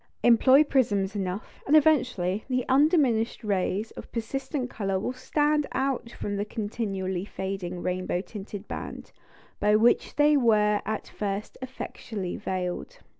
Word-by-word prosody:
Employ 260 +4 +6
prisms 210 -9 +1
enough, 190 0 -4
and 295 - +5
eventually 250 - +3
the 255 -1 0
undiminished 265 -6 +3
rays 205 +1 -1
of - - -11
persistent 260 +3 -3
colour 195 -5 -2
will 250 - -2
stand 295 +3 +1
out 265 -2 -1
from 205 -3 -4
the 200 - 0
continually 205 -4 -3
fading 190 -3 -5
rainbow 180 0 -1
tinted 205 +1 -8
band, - - -7 0.5
by 210 +1 +4
which 225 +3 +3
they 295 0 +5
were 210 -5 +3
at 215 -1 -3
first 200 0 -4
effectually 220 -6 -5
veiled. 185 - -4
215 Hz, 130 wpm, -27 LUFS, 195-260 Hz, 0.5 s, Employ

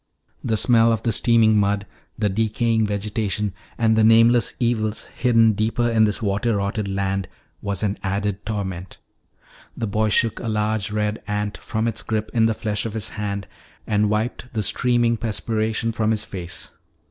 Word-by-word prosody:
The 110 - 0
smell 115 0 +4
of 115 - -1
the 115 - +1
steaming 115 0 +4
mud, 100 0 +1 0.3
the 105 - +1
decaying 110 +2 +1
vegetation, 105 0 -2 0.2
and 110 -1 +3
the 110 - +4
nameless 115 +1 +5
evils 110 -3 0
hidden 115 -3 +4
deeper 110 +3 0
in 110 -2 +4
this 105 +1 -1
water 105 +3 0
rotted 100 +1 -2
land 95 -1 -1 0.3
was 100 0 -3
an 100 -1 -1
added 100 +1 -2
torment. 95 -4 -5 0.8
The - - -2
boy 110 +1 0
shook 115 +1 +2
a 120 - -5
large 110 -1 -1
red 105 0 -2
ant 105 0 -2
from 110 +1 -2
its 115 - -1
grip 110 -1 -3
in 115 -1 +4
the 110 - 0
flesh 105 0 -1
of 115 - -7
his 110 -3 -2
hand 100 -1 -4 0.4
and 105 -1 +1
wiped 115 +3 -2
the 110 - 0
streaming 120 +1 +2
perspiration 110 0 -1
from 110 -1 0
his 110 -1 0
face. 90 -2 -7
110 Hz, 170 wpm, -22 LUFS, 105-115 Hz, 0.8 s, nameless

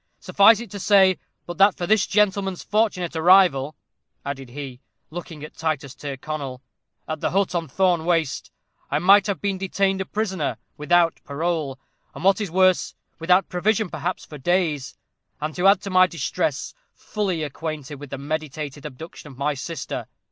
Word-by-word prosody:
Suffice 205 +2 +5
it 235 -5 -9
to 200 - -6
say, 190 -2 +4 0.3
that 175 - -6
but 200 0 +5
for 175 - -2
this 215 +2 +3
gentleman's 195 -2 +1
fortunate 200 -6 0
arrival," 160 -4 +4 0.5
added 135 -2 -5
he, 130 -1 -8 0.3
looking 165 -2 -8
at 155 - -9
Titus 150 -4 -2
Tyrconnel, 140 -1 -6 0.5
"at 155 0 -4
the - - +1
hut 195 +1 +1
on 170 -2 -1
Thorne 180 +2 +1
Waste, 165 -4 0 0.4
I 145 - +1
might 195 +5 +5
have 200 - -2
been 195 -2 -2
detained 195 0 0
a - - -3
prisoner, 190 -7 -2 0.2
without 170 +2 +2
parole, 150 -2 -2 0.4
and, - - -8
what 195 +2 +4
is 200 - -2
worse, 185 +1 +2 0.2
without 180 +3 +3
provision 200 +2 0
perhaps 175 +5 -3
for 150 - -10
days; 160 -3 0 0.4
and 155 +1 -3
to 180 +4 +2
add 195 - +5
to 200 - -6
my 185 0 +6
distress, 170 -6 -2 0.2
fully 190 -7 -2
acquainted 150 -1 -6
with 145 -1 -9
the 140 - -5
meditated 150 0 -5
abduction 150 +3 -11
of 130 - -15
my 145 +2 0
sister. 140 +1 -5
170 Hz, 165 wpm, -23 LUFS, 150-190 Hz, 0.5 s, my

